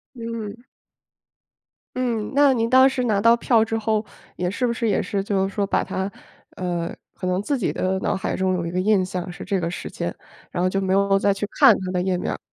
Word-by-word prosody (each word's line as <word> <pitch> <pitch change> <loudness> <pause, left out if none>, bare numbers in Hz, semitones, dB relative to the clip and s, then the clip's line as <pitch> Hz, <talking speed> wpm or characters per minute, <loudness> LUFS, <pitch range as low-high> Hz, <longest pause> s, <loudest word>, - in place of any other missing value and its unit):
嗯。 230 -1 -6 1.3
嗯， 235 -4 -1
那 280 -1 +5
您 230 -2 0
当 260 +1 +7
时 265 -1 -2
拿 215 -5 +1
到 230 +3 +6
票 235 -1 +3
之 225 0 -2
后， 220 -1 0 0.3
也 180 0 -1
是 225 +7 -1
不 240 - +1
是 235 0 -1
也 210 - +2
是 200 - -2
就 195 -1 0
是 195 - -9
说 200 -1 0
把 - - +1
它， 190 +1 -3 0.5
呃， 175 -2 -3 0.2
可 185 - -5
能 180 +1 0
自 280 +7 -1
己 235 - -1
的 190 +1 -1
脑 - - 0
海 190 - -2
中 185 0 0
有 175 -2 -1
一 170 - -4
个 180 - -1
印 195 0 +3
象 180 -1 -4
是 175 - -8
这 195 -1 -1
个 170 -1 -2
时 175 - -6
间， - - -4 0.4
然 175 - -1
后 185 - +3
就 195 - 0
没 190 -1 0
有 195 0 +3
再 200 0 +3
去 200 +1 -3
看 - - +8
它 185 -1 -3
的 180 -1 0
页 185 0 0
面 - - -2
儿？ - - -4
200 Hz, 260 characters per minute, -23 LUFS, 185-230 Hz, 1.3 s, 看